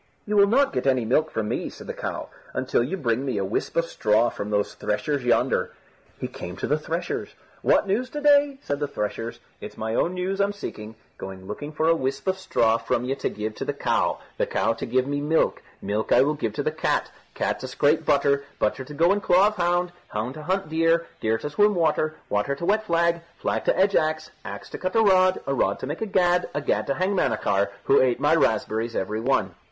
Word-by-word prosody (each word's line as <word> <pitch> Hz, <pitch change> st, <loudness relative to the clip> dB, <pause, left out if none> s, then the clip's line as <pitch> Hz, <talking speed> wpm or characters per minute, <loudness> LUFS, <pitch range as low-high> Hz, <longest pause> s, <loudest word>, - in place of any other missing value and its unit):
"You 210 Hz, -1 st, -1 dB
will 200 Hz, -1 st, +6 dB
not 270 Hz, +6 st, +3 dB
get 130 Hz, 0 st, -1 dB
any 130 Hz, -3 st, +2 dB
milk 155 Hz, +7 st, +2 dB
from 110 Hz, -1 st, -2 dB
me," -, -, -2 dB
said -, -, -12 dB
the -, -, -5 dB
cow, -, -, -5 dB, 0.3 s
"until -, -, +1 dB
you 145 Hz, +11 st, -2 dB
bring 125 Hz, -4 st, 0 dB
me 130 Hz, -6 st, -2 dB
a 100 Hz, -, 0 dB
whisp 100 Hz, -, -3 dB
of 170 Hz, -, +3 dB
straw 110 Hz, -5 st, +2 dB
from 100 Hz, -, -5 dB
those 105 Hz, -1 st, 0 dB
threshers 140 Hz, +6 st, -2 dB
yonder." 120 Hz, -, +1 dB, 0.5 s
He -, -, -3 dB
came 90 Hz, 0 st, -8 dB
to -, -, -3 dB
the 150 Hz, +2 st, +1 dB
threshers. 165 Hz, +3 st, -4 dB, 0.3 s
"What -, -, +3 dB
news 235 Hz, +7 st, 0 dB
to 295 Hz, -, -5 dB
day?" 285 Hz, -1 st, +4 dB
said 145 Hz, 0 st, -2 dB
the 145 Hz, -, -1 dB
threshers. 115 Hz, -2 st, -4 dB, 0.2 s
"It's -, -, -9 dB
my 110 Hz, 0 st, -3 dB
own 175 Hz, +9 st, +1 dB
news 190 Hz, +2 st, -1 dB
I'm 200 Hz, +1 st, +1 dB
seeking. 110 Hz, -, -7 dB, 0.2 s
Going 95 Hz, -1 st, -8 dB
looking 145 Hz, +10 st, -6 dB
for 155 Hz, +1 st, 0 dB
a 165 Hz, -, +6 dB
whisp 135 Hz, -4 st, -2 dB
of 190 Hz, 0 st, 0 dB
straw 115 Hz, -11 st, +2 dB
from 120 Hz, -, -1 dB
ye 130 Hz, -, 0 dB
to 140 Hz, -, -2 dB
give 105 Hz, +1 st, -4 dB
to -, -, -3 dB
the -, -, -2 dB
cow, -, -, +1 dB, 0.2 s
the -, -, +1 dB
cow -, -, +1 dB
to -, -, -6 dB
give 130 Hz, 0 st, +1 dB
me 145 Hz, +1 st, -2 dB
milk, 155 Hz, +3 st, +1 dB, 0.2 s
milk 105 Hz, +2 st, -2 dB
I -, -, +6 dB
will 150 Hz, +2 st, +1 dB
give 115 Hz, -8 st, -3 dB
to -, -, -2 dB
the -, -, 0 dB
cat, -, -, -1 dB, 0.2 s
cat -, -, -1 dB
to 130 Hz, -, -6 dB
scrape 145 Hz, +5 st, +2 dB
butter, 140 Hz, -2 st, +2 dB
butter 105 Hz, +5 st, 0 dB
to 150 Hz, +3 st, -10 dB
go 170 Hz, +5 st, +4 dB
in 205 Hz, +1 st, +1 dB
claw 190 Hz, +2 st, +5 dB
of 210 Hz, -, -10 dB
hound, 175 Hz, 0 st, +1 dB, 0.2 s
hound 110 Hz, +4 st, -3 dB
to 155 Hz, -, -9 dB
hunt 190 Hz, +5 st, -1 dB
deer, 165 Hz, +1 st, +2 dB
deer 110 Hz, 0 st, +1 dB
to 150 Hz, -, -5 dB
swim 205 Hz, +6 st, +3 dB
water, 155 Hz, -2 st, +1 dB
water 105 Hz, +7 st, 0 dB
to 155 Hz, -, -5 dB
wet 215 Hz, +3 st, +2 dB
flag, 170 Hz, 0 st, +2 dB, 0.2 s
flag -, -, -2 dB
to -, -, +2 dB
edge 195 Hz, +1 st, +3 dB
axe, 155 Hz, 0 st, 0 dB
axe -, -, -7 dB
to -, -, -6 dB
cut 185 Hz, 0 st, -3 dB
a 225 Hz, -, +5 dB
rod, 185 Hz, -2 st, +4 dB
a 140 Hz, -, -1 dB
rod -, -, +1 dB
to -, -, -6 dB
make 150 Hz, +8 st, -5 dB
a 220 Hz, -, -1 dB
gad, 180 Hz, -2 st, +2 dB
a 145 Hz, -, 0 dB
gad -, -, 0 dB
to 140 Hz, -, 0 dB
hang 190 Hz, +2 st, 0 dB
Manachar, 100 Hz, -, +1 dB, 0.2 s
who 135 Hz, -, +4 dB
ate 125 Hz, -2 st, +2 dB
my 145 Hz, +2 st, +3 dB
raspberries 115 Hz, -5 st, +1 dB
every 105 Hz, +3 st, -2 dB
one." 130 Hz, +4 st, +1 dB
150 Hz, 235 wpm, -25 LUFS, 120-180 Hz, 0.5 s, will